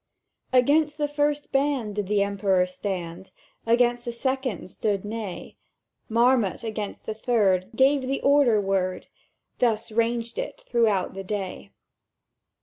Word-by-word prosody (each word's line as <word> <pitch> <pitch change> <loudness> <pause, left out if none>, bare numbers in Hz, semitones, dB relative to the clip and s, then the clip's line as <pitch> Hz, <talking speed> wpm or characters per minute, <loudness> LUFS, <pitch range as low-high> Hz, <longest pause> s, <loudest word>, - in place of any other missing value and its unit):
"Against 290 +4 +3
the 295 -1 0
first 290 0 -1
band 270 -6 0
did 205 -2 -3
the 205 0 +2
Emperor 195 -2 +1
stand; 185 -1 -5 0.4
Against 240 +1 +3
the 240 - -4
second 255 -6 -3
stood 205 -2 -1
Ney; 210 -3 -6 0.5
Marmont 235 -2 +2
against 215 -2 -5
the 220 - -3
third 205 -5 +1
gave 270 +3 +4
the 265 +1 -2
order 275 -6 +4
word: 190 -2 -1 0.5
—Thus 230 -1 +1
raged 230 +1 -1
it - - -5
throughout 215 - +1
the 195 0 -6
day. 190 - -5
225 Hz, 130 wpm, -25 LUFS, 195-260 Hz, 0.5 s, gave